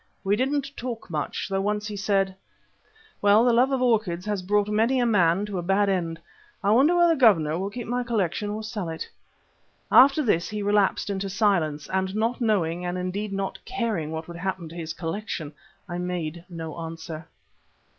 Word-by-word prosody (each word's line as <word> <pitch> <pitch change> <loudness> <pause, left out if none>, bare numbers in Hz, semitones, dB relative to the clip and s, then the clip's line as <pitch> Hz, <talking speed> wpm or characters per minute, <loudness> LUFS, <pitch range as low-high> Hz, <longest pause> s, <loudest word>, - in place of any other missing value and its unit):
We 195 +1 +2
didn't 275 +3 -1
talk 235 -6 -6
much, 150 -3 -3
though 195 0 -1
once 210 +1 -1
he 210 -1 -5
said: 195 -1 +1 0.9
"Well, 205 +3 +5
the 245 - +4
love 250 +3 +4
of 260 -1 +1
orchids 210 -8 +1
has 205 -2 -1
brought 205 +2 +1
many 225 +5 +2
a 245 - +2
man 195 -3 +3
to 200 -3 -4
a - - -2
bad 195 +3 +2
end. 170 -4 -1 0.4
I 200 - +3
wonder 275 +10 +5
whether 345 -1 +5
the 310 - -4
Governor 165 - +4
will 195 +1 -2
keep 235 +3 -6
my 245 +2 -1
collection 210 -4 -1
or 215 +1 -4
sell 215 -5 -4
it." 160 - -5 0.8
After 275 +3 +7
this 175 -8 +1
he 210 -1 -3
relapsed 205 0 +2
into 195 0 -3
silence, 175 -7 +1
and 190 +1 -1
not 230 +3 0
knowing 180 -7 +1
and 180 0 -2
indeed 190 +3 -3
not 195 0 -3
caring 220 -11 -2
what 160 0 -5
would 170 0 -8
happen 185 -1 -3
to 165 - -11
his 165 -2 -5
collection, 165 -2 -4 0.3
I 175 -1 -4
made 175 -2 -4
no 165 -2 -6
answer. 165 -1 -7
195 Hz, 190 wpm, -25 LUFS, 170-220 Hz, 0.9 s, After